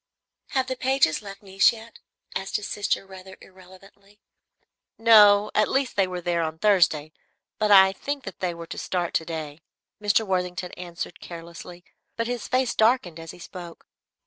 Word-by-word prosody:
"Have 265 Hz, -1 st, +1 dB
the 260 Hz, 0 st, -3 dB
Pages 260 Hz, -, +1 dB
left 200 Hz, 0 st, -11 dB
Nice 195 Hz, 0 st, +4 dB
yet?" 230 Hz, 0 st, -12 dB, 0.4 s
asked 190 Hz, 0 st, -4 dB
his 210 Hz, -, -2 dB
sister, 205 Hz, -1 st, -2 dB
rather 190 Hz, 0 st, -12 dB
irrelevantly. 190 Hz, +2 st, -18 dB, 0.8 s
"No, 210 Hz, -2 st, +6 dB
at 215 Hz, -, +2 dB
least 270 Hz, -1 st, 0 dB
they 195 Hz, -2 st, +2 dB
were 180 Hz, -1 st, -5 dB
there 170 Hz, -1 st, 0 dB
on 160 Hz, -1 st, -3 dB
Thursday, 165 Hz, -6 st, +2 dB, 0.5 s
but 215 Hz, -1 st, +1 dB
I 190 Hz, -1 st, +8 dB
think 280 Hz, +6 st, -5 dB
that -, -, -9 dB
they 180 Hz, -2 st, -2 dB
were 170 Hz, 0 st, -8 dB
to -, -, -7 dB
start 175 Hz, -2 st, -2 dB
to 160 Hz, -, 0 dB
day." 160 Hz, -2 st, -6 dB, 0.4 s
Mr. 210 Hz, +1 st, +2 dB
Worthington 180 Hz, -1 st, -2 dB
answered 175 Hz, 0 st, -7 dB
carelessly, 170 Hz, +1 st, -10 dB, 0.3 s
but 230 Hz, -, -2 dB
his 245 Hz, -1 st, -4 dB
face 255 Hz, -1 st, +1 dB
darkened 220 Hz, -7 st, +2 dB
as 165 Hz, 0 st, -10 dB
he -, -, -9 dB
spoke. 175 Hz, -1 st, -11 dB
190 Hz, 170 wpm, -25 LUFS, 175-215 Hz, 0.8 s, I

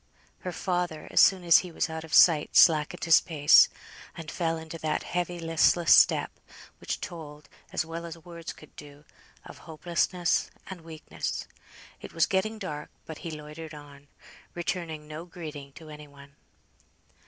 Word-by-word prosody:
Her 180 Hz, -, -5 dB
father, 175 Hz, -3 st, -3 dB
as -, -, +2 dB
soon 190 Hz, -2 st, +4 dB
as 170 Hz, -1 st, +6 dB
he 180 Hz, -, -7 dB
was -, -, -1 dB
out 160 Hz, 0 st, -6 dB
of 160 Hz, -, -12 dB
sight, 155 Hz, -3 st, +5 dB
slackened 155 Hz, -3 st, +4 dB
his 165 Hz, -1 st, +6 dB
pace, 150 Hz, -4 st, +5 dB, 0.5 s
and 165 Hz, -2 st, -7 dB
fell 165 Hz, -2 st, -1 dB
into 160 Hz, +1 st, -9 dB
that 155 Hz, -1 st, -2 dB
heavy 175 Hz, 0 st, -3 dB
listless 165 Hz, 0 st, +3 dB
step, -, -, +4 dB, 0.5 s
which -, -, -4 dB
told 150 Hz, -3 st, -9 dB, 0.2 s
as -, -, -1 dB
well 165 Hz, +1 st, -6 dB
as 165 Hz, 0 st, -9 dB
words 170 Hz, 0 st, -9 dB
could 155 Hz, -, -16 dB
do, 145 Hz, 0 st, -13 dB, 0.4 s
of -, -, -12 dB
hopelessness 175 Hz, +2 st, 0 dB, 0.2 s
and 185 Hz, -3 st, -9 dB
weakness. 160 Hz, -1 st, -6 dB, 0.6 s
It -, -, -10 dB
was 165 Hz, -1 st, +3 dB
getting 210 Hz, +3 st, -1 dB
dark, 150 Hz, -8 st, -6 dB, 0.2 s
but 160 Hz, -, -9 dB
he 170 Hz, -, -6 dB
loitered 155 Hz, +1 st, -9 dB
on, 145 Hz, -1 st, -14 dB, 0.5 s
returning 165 Hz, -3 st, -4 dB
no 155 Hz, +2 st, -8 dB
greeting 155 Hz, -5 st, -9 dB
to 160 Hz, 0 st, -13 dB
any 150 Hz, 0 st, -11 dB
one. 140 Hz, 0 st, -17 dB
160 Hz, 160 wpm, -27 LUFS, 150-175 Hz, 0.6 s, as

